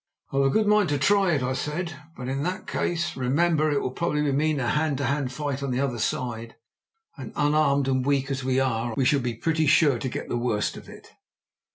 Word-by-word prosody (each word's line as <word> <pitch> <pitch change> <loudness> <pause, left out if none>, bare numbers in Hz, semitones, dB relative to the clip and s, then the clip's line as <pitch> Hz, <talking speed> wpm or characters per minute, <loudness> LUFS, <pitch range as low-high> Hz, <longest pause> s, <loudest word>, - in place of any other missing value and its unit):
"I've 135 - +2
a 135 - +3
good 215 +9 +2
mind 210 -4 +3
to 145 - +1
try 195 +4 +3
it," 140 -4 0
I 130 +1 -1
said; 155 +6 -3 0.2
"but 125 - -6
in 135 +1 -2
that 180 +5 -3
case, 170 0 -2
remember, 155 +5 +1
it 145 -1 0
will 130 - -2
probably 150 0 -1
mean 150 +1 +1
a 120 - -1
hand 150 -2 0
to 140 - -2
hand 135 -1 -1
fight 140 0 -3
on 140 - -2
the 125 0 -1
other 130 -4 -1
side, 115 0 -3 0.6
and, - - -7
unarmed 145 -3 +2
and 130 -1 +1
weak 140 0 0
as 130 -1 -3
we 130 0 +1
are, 120 -3 -1
we 130 - +2
shall 140 +2 +3
be 120 -2 -3
pretty 160 +5 0
sure 145 -4 +4
to 130 - -3
get - - -5
the - - -2
worst 115 -3 -1
of - - -11
it." - - -14
140 Hz, 230 wpm, -25 LUFS, 130-155 Hz, 0.6 s, sure